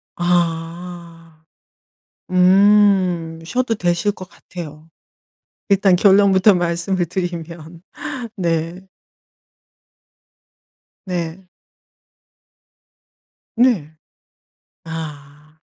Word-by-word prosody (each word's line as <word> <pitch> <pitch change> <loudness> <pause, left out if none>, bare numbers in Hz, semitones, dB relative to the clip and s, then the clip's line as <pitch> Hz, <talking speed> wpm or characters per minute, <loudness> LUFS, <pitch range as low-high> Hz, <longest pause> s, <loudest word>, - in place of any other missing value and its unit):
아. 170 -1 -3 0.9
음 185 -3 +4
쉬어도 245 +5 -1
되실 175 +1 0
것 185 -2 -11
같아요. 160 -2 -11 0.8
일단 195 -2 +4
결론부터 195 +1 +5
말씀을 175 +1 -1
드리면. 170 -2 -6 0.6
네. 170 0 -2 2.3
네. 175 0 -4 2.1
네. 210 - +2 0.9
아. 155 -1 -9
175 Hz, 105 characters per minute, -19 LUFS, 165-190 Hz, 2.3 s, 결론부터